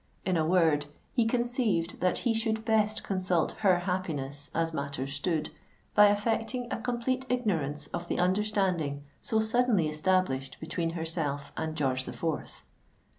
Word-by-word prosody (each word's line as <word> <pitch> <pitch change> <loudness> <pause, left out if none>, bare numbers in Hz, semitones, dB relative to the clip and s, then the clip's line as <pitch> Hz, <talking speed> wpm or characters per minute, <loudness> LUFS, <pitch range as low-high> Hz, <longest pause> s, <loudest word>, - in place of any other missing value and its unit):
In 185 - +1
a 160 - +2
word, 160 -5 +3 0.3
he 235 -3 +3
conceived 235 -7 0
that 180 0 +2
he 235 - +3
should 220 0 -1
best 215 -1 +2
consult 185 -4 +1
her 185 -4 +4
happiness, 150 -7 -3
as 165 0 +1
matters 140 -2 -3
stood, 155 +1 -1 0.4
by 210 0 +8
affecting 225 +4 0
a - - -3
complete 250 +2 -1
ignorance 165 - 0
of 175 0 -3
the - - -1
understanding 180 -6 +1 0.2
so 220 - +1
suddenly 220 -5 +3
established 155 -4 0
between 165 +1 -2
herself 160 -4 -2
and 160 0 -3
George 130 -2 0
the - - -6
Fourth. 160 -3 -4
180 Hz, 145 wpm, -29 LUFS, 155-220 Hz, 0.4 s, by